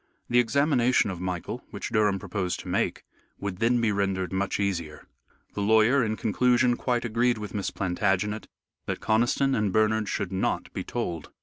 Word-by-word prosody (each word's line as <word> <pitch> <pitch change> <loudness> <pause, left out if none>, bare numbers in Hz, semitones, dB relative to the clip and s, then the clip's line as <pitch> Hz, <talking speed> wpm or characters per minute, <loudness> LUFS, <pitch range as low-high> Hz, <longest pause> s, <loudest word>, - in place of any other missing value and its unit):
The 120 - +5
examination 125 -3 +2
of 90 -2 -7
Michael 90 -2 -4
which - - -5
Durham 105 -2 +2
proposed 95 -1 -3
to - - -12
make, - - -1 0.3
would 100 -2 -4
then 120 +4 +2
be 115 -2 +2
rendered 95 -2 -1
much 100 +1 -1
easier. 85 -7 -2 0.5
The 105 - -3
lawyer, 110 +5 +4
in 110 -1 -1
conclusion, 120 +3 +2
quite 120 -1 -1
agreed 120 +1 +1
with 105 -1 -7
Miss 100 -2 -2
Plantagenet 100 +3 -1 0.4
that - - -2
Conniston 120 +5 +2
and 105 -2 +1
Bernard 110 0 +2
should 100 -3 -2
not 95 - -1
be - - -3
told. 85 -10 -4
105 Hz, 170 wpm, -27 LUFS, 95-120 Hz, 0.5 s, The